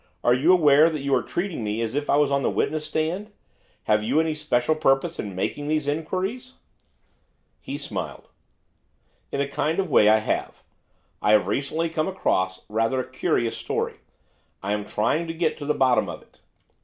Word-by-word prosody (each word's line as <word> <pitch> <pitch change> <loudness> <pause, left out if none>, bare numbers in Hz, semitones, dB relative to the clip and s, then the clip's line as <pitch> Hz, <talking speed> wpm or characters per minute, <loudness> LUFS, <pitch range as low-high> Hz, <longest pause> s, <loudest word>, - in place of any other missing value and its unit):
Are 120 - +5
you 140 +8 +4
aware 155 -3 +6
that 155 -4 -4
you 140 -1 0
are 130 - +3
treating 175 - -3
me 105 +1 -2
as 115 0 -3
if 145 +1 -2
I - - +4
was 145 -1 +3
on 140 0 +2
the - - +1
witness 155 0 -1
stand? 175 +7 -2 0.5
Have 105 0 +2
you 130 +8 +2
any 160 -1 +1
special 150 -2 +1
purpose 155 +2 +1
in 100 -3 -5
making 145 +10 -3
these 155 -1 0
inquiries?' 190 - -3 1.0
He - - -6
smiled. - - -6 1.0
'In 140 - -1
a 140 - 0
kind 150 +3 -1
of 195 - +1
a - - -9
way 105 - +6
I 110 - +6
have. 110 - -3 0.6
I 105 - +3
have 105 - +5
recently 155 +4 -1
come 160 0 -1
across 95 - -1
rather 115 +4 0
a 130 - -3
curious 115 -1 0
story; - - -3 0.7
I 100 +1 -1
am 105 -1 -2
trying 155 +10 0
to 165 - -5
get 165 -1 0
to 145 - -7
the 150 - +1
bottom 130 -3 +3
of - - -8
it. - - -29
145 Hz, 190 wpm, -24 LUFS, 120-160 Hz, 1.0 s, aware